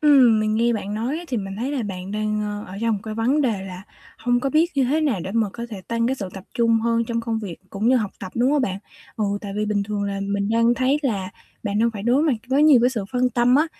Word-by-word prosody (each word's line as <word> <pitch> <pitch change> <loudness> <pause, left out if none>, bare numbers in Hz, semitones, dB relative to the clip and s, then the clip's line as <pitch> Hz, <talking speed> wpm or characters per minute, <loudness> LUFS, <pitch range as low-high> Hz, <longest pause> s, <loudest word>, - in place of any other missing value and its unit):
Ừm, 260 -7 +6
mình 215 0 +1
nghe 235 +2 +2
bạn 210 -2 -3
nói 240 +8 -2
á, 345 - -8
thì 250 - -1
mình 195 -2 -4
thấy 250 +6 -2
là 270 -4 -1
bạn 190 -2 -5
đang, 215 0 -1
ơ, 210 0 -4
ở 195 - -6
trong 230 -1 +1
một 200 - -4
cái 220 -1 -5
vấn 250 +7 +2
đề 225 -8 0
là 185 -1 -8 0.4
hông 245 +1 +1
có 275 - -1
biết 320 +4 +3
như 275 -2 +3
thế 290 +6 +1
nào 270 - +1
để 190 - -4
mà 225 -1 +1
có 235 0 -6
thể 205 -3 -6
tăng 230 0 +1
cái 260 - +1
sự 200 -6 -5
tập 190 -1 -8
trung 230 -1 +3
hơn 230 0 +1
trong 230 0 -2
công 230 -1 -2
việc 195 -7 -6
cũng 210 +3 0
như 260 - +5
học 215 -5 -1
tập, 190 -2 -7
đúng 245 +3 +2
hông 295 -2 +2
bạn? 190 -5 -2 0.4
Ừ, 215 - 0 0.2
tại 200 -2 -6
vì 210 - 0
bình 205 -1 0
thường 205 0 -3
là 200 -1 -2
mình 200 0 -1
đang 230 +2 +3
thấy 260 +4 +2
là 200 -9 -1 0.3
bạn 205 -1 -1
đang 230 +1 +3
phải 210 -3 -7
đối 245 +6 +3
mặt 315 -3 +3 0.2
với 270 +3 +3
nhiều 300 -5 +7
cái 245 +2 +4
sự 225 -6 -3
phân 250 0 +2
tâm 240 +1 +3
á, 300 +4 +4
230 Hz, 295 wpm, -23 LUFS, 205-250 Hz, 0.4 s, nhiều